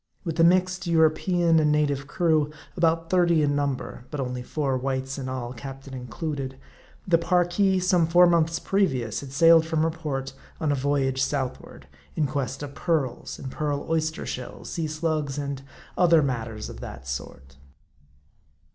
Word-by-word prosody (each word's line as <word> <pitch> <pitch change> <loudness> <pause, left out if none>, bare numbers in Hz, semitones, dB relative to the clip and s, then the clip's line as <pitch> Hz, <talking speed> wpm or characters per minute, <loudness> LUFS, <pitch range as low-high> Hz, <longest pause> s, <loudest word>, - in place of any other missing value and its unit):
With 165 -3 -4
a - - +6
mixed 185 +1 +3
European 165 +1 +3
and 150 -1 +3
native 145 -2 +1
crew, 155 -2 +2 0.3
about 165 0 +1
thirty 170 -4 +4
in 145 -1 +1
number 140 -3 -3
(but 150 - -5
only 125 -1 -3
four 135 +1 -1
whites 135 +1 -2
in 130 -1 -4
all, 125 -2 -4
captain 135 +1 -9
included), 130 +1 -5 0.5
the 170 -2 +4
Parki, 180 +2 +2
some 180 -2 +3
four 175 +2 +6
months 165 -1 +3
previous, 130 - 0
had 140 -2 -9
sailed 165 +3 +6
from 160 -1 0
her 165 - +1
port 145 -5 -4 0.3
on 155 -3 0
a - - +2
voyage 135 -1 0
southward, 135 -2 -3 0.3
in 155 - +1
quest 135 -1 -3
of 140 -1 -7
pearls, 140 -7 -2
and 130 - -7
pearl 145 -1 -2
oyster 160 0 -1
shells, 125 - -6
sea 165 -2 -2
slugs, 155 -2 -2
and 140 -2 -3 0.3
other 170 -3 +5
matters 115 -5 -3
of - - -9
that 65 0 -9
sort. 65 0 -7
150 Hz, 160 wpm, -25 LUFS, 135-165 Hz, 0.5 s, a